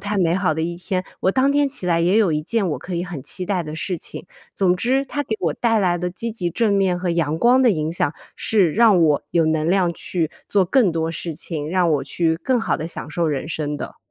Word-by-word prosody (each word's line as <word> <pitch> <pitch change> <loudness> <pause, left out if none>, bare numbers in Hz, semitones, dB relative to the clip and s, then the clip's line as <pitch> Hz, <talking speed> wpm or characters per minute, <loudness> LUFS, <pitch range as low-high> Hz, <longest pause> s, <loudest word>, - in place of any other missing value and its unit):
太 205 +1 -3
美 170 -2 +2
好 185 -3 +1
的 160 - -3
一 170 +1 -2
天， 185 +1 -3 0.2
我 190 - +2
当 265 +6 +2
天 290 0 +2
起 265 -9 -3
来 170 -1 +2
也 180 +5 +3
有 200 -7 +3
一 150 0 -1
件 205 +3 0
我 150 - -2
可 180 -1 -5
以 175 - -2
很 175 -7 -7
期 180 +6 -5
待 185 -3 0
的 155 - -7
事 180 +2 -2
情。 - - -9 0.3
总 185 -2 +2
之， 260 +8 +1
它 290 +1 -3
给 225 -6 -3
我 165 -4 0
带 225 -2 +1
来 180 -4 +2
的 180 +1 -3
积 230 +5 -5
极 180 -6 -2
正 220 +3 +1
面 190 -3 +2
和 180 0 -3
阳 165 -2 0
光 250 +6 +4
的 245 - +5
影 155 -4 -1
响， 150 -3 0 0.2
是 195 -8 +2
让 215 -3 +5
我 150 -3 +3
有 165 -2 +2
能 160 +1 +1
量 185 -2 +2
去 165 -1 -2 0.2
做 200 -2 +3
更 215 +2 +3
多 165 0 -2
事 170 0 -4
情， 155 -1 -5
让 180 -1 +2
我 145 - 0
去 165 -2 0
更 255 +5 +2
好 225 - 0
地 155 - -5
享 165 -3 -6
受 170 +2 0
人 145 -1 -2
生 150 -2 -3
的。 - - -7
180 Hz, 275 characters per minute, -21 LUFS, 165-205 Hz, 0.3 s, 的